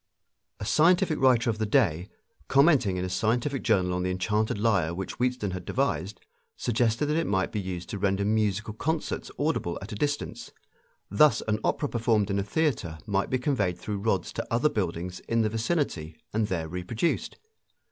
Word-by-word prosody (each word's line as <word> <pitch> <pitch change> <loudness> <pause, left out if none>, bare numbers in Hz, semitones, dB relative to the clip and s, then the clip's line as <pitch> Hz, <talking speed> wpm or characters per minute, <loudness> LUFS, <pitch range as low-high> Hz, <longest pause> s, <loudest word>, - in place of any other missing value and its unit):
A - - -4
scientific 165 - +3
writer 125 -3 +4
of 110 - -6
the 110 - +1
day, 95 - +2 0.4
commenting 135 - +4
in 90 - -1
a - - -2
scientific 120 +8 0
journal 90 -2 +2
on 90 - -1
the 90 - -1
enchanted 105 +4 0
lyre 100 -7 +1
which 95 +4 -5
Wheatstone 125 -5 0
had 90 0 -5
devised, 105 -5 -1 0.4
suggested 115 +3 +1
that 150 +2 0
it 165 - 0
might 95 -2 0
be 105 - -2
used 90 -2 -5
to 100 - -4
render 100 0 +1
musical 105 0 0
concerts 160 +8 -2
audible 145 - -1
at 95 - -9
a - - -4
distance. 145 +6 -3 0.6
Thus 145 +9 +4
an 110 0 +1
opera 145 - 0
performed 110 -5 +1
in 100 - +1
a - - 0
theater 105 - -1
might 100 -1 0
be 130 - +1
conveyed 125 - 0
through 100 +3 -4
rods 100 -3 -1
to - - -4
other 120 +6 +3
buildings 90 - -3
in 115 0 +2
the 110 - +1
vicinity 110 - -2 0.2
and 110 0 +1
there 85 -4 -2
reproduced. 90 - -2
105 Hz, 180 wpm, -27 LUFS, 95-125 Hz, 0.6 s, writer